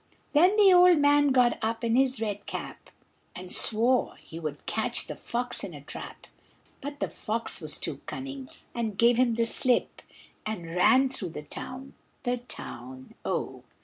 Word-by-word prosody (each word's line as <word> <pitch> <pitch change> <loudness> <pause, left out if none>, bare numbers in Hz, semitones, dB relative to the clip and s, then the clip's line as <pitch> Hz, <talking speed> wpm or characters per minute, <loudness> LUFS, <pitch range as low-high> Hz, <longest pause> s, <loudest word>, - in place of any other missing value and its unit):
Then 355 +7 +5
the 400 -3 +7
old 360 -1 +7
man 290 0 +4
got 250 -3 +3
up 225 +1 -1
in 230 0 +2
his 260 -2 +2
red 205 -2 -3
cap, - - -7 0.5
And 180 0 -5
swore 235 +3 +2
he 165 - -10
would 155 -3 -6
catch 220 +2 -1
the - - -6
fox 245 +1 -2
in 185 -6 -6
a 145 - -10
trap; 145 - -9 0.6
But 285 +1 -6
the - - 0
fox 225 +2 -2
was - - -1
too - - -4
cunning, 275 0 -6 0.2
and 225 -4 -3
gave 235 +1 +5
him 245 -2 +3
the 230 0 +1
slip, 245 +1 +1 0.4
And 175 -6 -5
ran 260 +9 +5
through 225 -9 -5
the 150 - -6
town, 260 - -8 0.3
the 245 -1 0
town, 130 - -8
oh! - - -3
240 Hz, 170 wpm, -28 LUFS, 205-265 Hz, 0.6 s, the